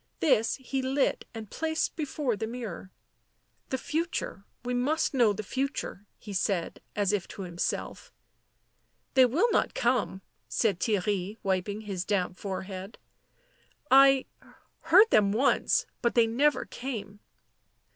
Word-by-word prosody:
This 230 -7 +3
he 265 0 -3
lit 265 +2 0
and 220 -3 -9
placed 320 0 -1
before 290 -5 -1
the 220 +2 -3
mirror. 225 -6 -7 0.4
" - - -44
The 260 - -1
future 315 - -3
— - - -37
we 250 - -1
must 275 +7 +1
know 240 -5 +4
the 205 +1 -4
future," 260 -4 -3
he 210 - -9
said, 190 -2 -1
as 205 -1 +1
if 200 -3 -1
to 195 - -7
himself. 175 -1 -4 0.5
" - - -45
They 260 -1 +6
will 345 - +2
not - - +1
come," 235 -6 0 0.3
said 190 - +1
Theirry, 205 0 -1
wiping 195 +2 -1
his 195 -4 -4
damp 185 -2 -1
forehead. 190 +1 -6 0.5
" - - -37
I 270 0 +7 0.3
— - - -34
heard 380 +7 +7
them 200 -2 +4
once 265 +5 +2
— - - -46
but 235 - +1
they 235 -1 +6
never 275 +7 +2
came." 210 -6 -6
225 Hz, 150 wpm, -28 LUFS, 200-270 Hz, 0.5 s, I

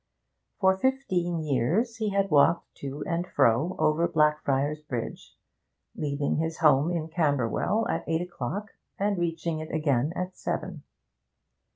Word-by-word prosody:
For 190 -1 +4
fifteen 185 -11 0
years 155 - 0
he 215 -2 -1
had 195 -2 0
walked 155 +3 +3
to 140 +1 -5
and 175 +1 -2
fro 135 +6 +2
over 160 +3 +2
Blackfriars 150 -1 +1
Bridge, 125 -7 -6 0.6
leaving 145 -1 -1
his 160 +1 -2
home 150 -1 +4
in 170 -3 -2
Camberwell 155 - 0
at - - -1
eight 165 0 +1
o'clock 180 - -5 0.3
and 200 +1 +1
reaching 165 -1 -2
it 155 0 -6
again 145 -3 +1
at 180 +1 -4
seven. - - -4
160 Hz, 135 wpm, -27 LUFS, 145-180 Hz, 0.6 s, For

